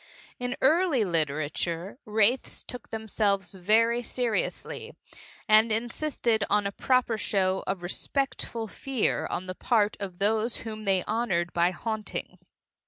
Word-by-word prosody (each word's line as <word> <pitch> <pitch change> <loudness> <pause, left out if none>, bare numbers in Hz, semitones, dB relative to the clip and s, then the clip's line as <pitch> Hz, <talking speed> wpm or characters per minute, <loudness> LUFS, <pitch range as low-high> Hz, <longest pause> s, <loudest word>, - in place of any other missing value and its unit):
In 245 +1 -3
early 305 - +4
literature 165 - -2
wraiths 220 +3 +1
took 250 -2 -8
themselves 205 -4 0
very 225 +6 +3
seriously, 250 - -2 0.5
and 215 +1 +6
insisted 235 -1 0
on 205 0 +3
a 200 - -1
proper 245 0 +1
show 190 -2 +1
of 190 -2 -2
respectful 230 +3 -1
fear 260 +3 -1
on 185 - -3
the 185 - -4
part 215 +1 +1
of 190 -3 -5
those 220 +4 +2
whom 215 -1 -6
they 190 -2 +3
honored 205 -6 -1
by 170 +1 +3
haunting. 215 +4 -5
215 Hz, 125 wpm, -28 LUFS, 190-235 Hz, 0.5 s, and